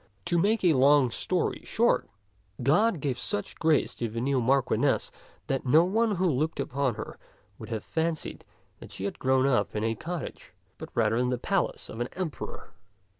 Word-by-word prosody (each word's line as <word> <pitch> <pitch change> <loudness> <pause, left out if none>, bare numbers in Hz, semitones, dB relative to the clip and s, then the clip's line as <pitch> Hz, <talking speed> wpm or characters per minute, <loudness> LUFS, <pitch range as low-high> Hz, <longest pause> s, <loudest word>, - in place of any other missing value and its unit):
To 175 - +1
make 210 +4 +2
a 175 -3 +5
long 135 -1 +5
story - - -1
short, - - +1 0.5
God 175 - +3
gave 130 -3 -2
such 205 -1 -3
grace 160 -3 +2
to 115 - -2
the 115 +2 -4
new 130 +1 +1
Marchioness 135 +2 +1 0.3
that 135 -1 -1
no 150 +6 +5
one 215 +3 +1
who 185 +1 0
looked 155 -1 0
upon 135 -2 -1
her - - -8 0.4
would 110 - -9
have 110 -3 -3
fancied 160 -1 -3 0.4
that - - -12
she 95 - -5
had 100 - -4
grown 130 0 +2
up 135 -5 +1
in 105 - -1
a 115 0 +1
cottage, 170 +9 -6 0.3
but - - -7
rather 110 -1 +2
in 125 0 +1
the 125 - 0
palace 120 - -1
of 110 - -8
an 120 - -2
emperor. 180 -5 -6
140 Hz, 180 wpm, -28 LUFS, 125-165 Hz, 0.5 s, a